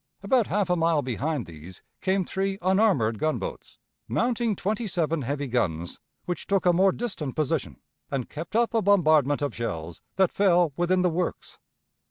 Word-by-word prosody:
About 235 +2 +2
half 200 -2 0
a - - +4
mile 165 -3 +2
behind 130 +2 -2
these 85 +2 -12 0.2
came 190 -1 +1
three 195 +2 -2
unarmored 185 - +2
gunboats, 155 0 -3 0.3
mounting 235 -3 0
twenty 215 +5 -2
seven 165 -4 0
heavy 140 +3 -2
guns, 90 -10 -2 0.3
which 175 - -4
took 195 -2 +1
a 175 - +5
more 190 +2 +4
distant 180 - -4
position, 135 - -1 0.3
and 135 -3 -2
kept 165 +6 -7
up 235 0 +2
a 225 - +2
bombardment 155 -8 +3
of 140 -5 -1
shells 85 -8 -5
that 190 -2 +3
fell 175 -6 +3
within 180 +2 +1
the 180 - +3
works. 175 +2 -3
170 Hz, 165 wpm, -26 LUFS, 135-195 Hz, 0.3 s, a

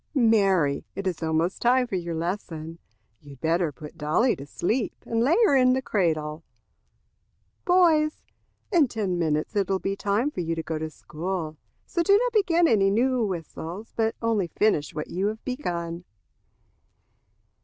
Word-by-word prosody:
"Mary, 195 - +3
it 195 +1 -5
is 180 -3 -2
almost 160 +3 0
time 250 +1 +4
for 235 - -11
your 170 -2 -3
lesson. 165 -2 -4 0.4
You 145 -1 -12
had 135 - -16
better 165 +1 +1
put 155 +3 -12
Dolly 160 - +2
to 140 +1 -9
sleep 220 - -1
and 230 0 0
lay 280 +8 +4
her 285 - +4
in 255 -1 +5
the 260 - 0
cradle." 160 -6 -1 1.2
"Boys, 330 -4 +3 0.5
in 335 -8 +4
ten 200 -7 -2
minutes 155 +3 -1
it 200 -2 +1
will 195 - +2
be 195 +1 -2
time 205 +8 0
for 180 - -4
you 165 -1 -2
to 165 - -4
go 160 -1 -3
to 160 0 -3
school. 155 +1 -5 0.3
So 345 - -1
do 400 +4 +5
not - - 0
begin 350 -5 +3
any 200 -6 +4
new 245 +4 +2
whistles, 180 +2 -5
but 225 0 0
only 220 -5 +1
finish 170 -5 0
what 150 - -5
you 190 +3 0
have 220 +1 -5
begun." 175 -10 -3
195 Hz, 165 wpm, -25 LUFS, 165-240 Hz, 1.2 s, in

